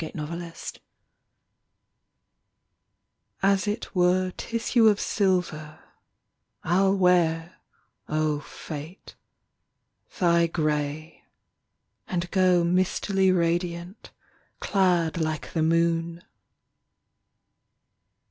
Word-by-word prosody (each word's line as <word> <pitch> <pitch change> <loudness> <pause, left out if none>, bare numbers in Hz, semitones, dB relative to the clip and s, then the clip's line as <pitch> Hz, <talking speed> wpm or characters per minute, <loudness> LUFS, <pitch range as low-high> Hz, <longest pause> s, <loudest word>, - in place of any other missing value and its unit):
FATE 160 - -7
DEFIED 170 +2 -7 2.6
As 195 +1 +2
it 210 +3 -4
Were 185 0 +2
tissue 230 0 +1
of 210 -2 +4
silver 175 -6 -1 0.9
I 175 +3 +2
ll 195 0 +3
wear, 175 -2 +2 0.5
O 155 -1 0
fate, 155 +4 -9 1.0
thy 170 -3 +3
grey, 155 -1 -3 0.8
And 175 -1 -3
go 185 -2 +3
mistily 185 +2 +1
radiant, 175 +2 -2 0.5
clad 175 -5 +1
Like 155 -1 -3
the 160 - 0
moon. 165 +1 +1
170 Hz, 75 wpm, -25 LUFS, 160-185 Hz, 2.6 s, of